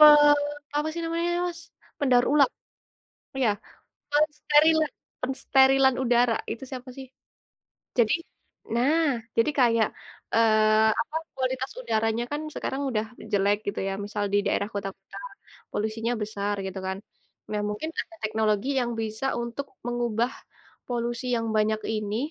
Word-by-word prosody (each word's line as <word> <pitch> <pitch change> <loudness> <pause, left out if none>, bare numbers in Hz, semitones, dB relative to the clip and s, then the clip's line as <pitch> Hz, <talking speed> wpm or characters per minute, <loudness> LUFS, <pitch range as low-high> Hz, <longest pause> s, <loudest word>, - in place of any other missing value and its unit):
pe - - +11 0.7
apa 300 +1 +1
sih 340 - -4
namanya 335 +1 -1 0.2
Mas? 340 -1 -7 0.4
Pendaur 250 -3 +4
ulang. 290 -2 +5 0.9
Iya. 250 -5 +3 0.6
Pensterilan 305 +1 +4 0.3
pensterilan 265 0 +4
udara 240 -1 +3 0.2
itu 230 - -5
siapa 255 -1 -7
sih? 265 -1 -8 0.9
Jadi 225 -3 +4 0.6
nah, 290 +8 +3 0.3
jadi 230 +6 +4
kayak, 230 -3 +4 0.5
eee, 215 -1 +5
apa, 305 - -5 0.2
kualitas 260 0 -2
udaranya 225 - 0
kan 295 - -1
sekarang 265 - -3
udah 215 -2 0 0.3
jelek 205 0 +3
gitu 200 - -2
ya, - - -1
misal 205 0 -2
di 205 - +4
daerah 200 0 +1
kota-kota, 195 -1 -6 0.5
polusinya 220 +2 -1
besar 205 -1 -2
gitu 190 0 -5
kan. 190 0 -2 0.5
Nah, 210 -1 -1
mungkin 210 +10 -3
ada 335 - -9
teknologi 215 +2 +1
yang 240 -1 -1
bisa 220 +4 -3 0.2
untuk 235 +4 -5 0.2
mengubah 240 -1 0 0.6
polusi 240 0 -2
yang 230 0 -1
banyak 215 0 +2 0.2
ini 210 0 -2
235 Hz, 130 wpm, -26 LUFS, 215-270 Hz, 0.9 s, pe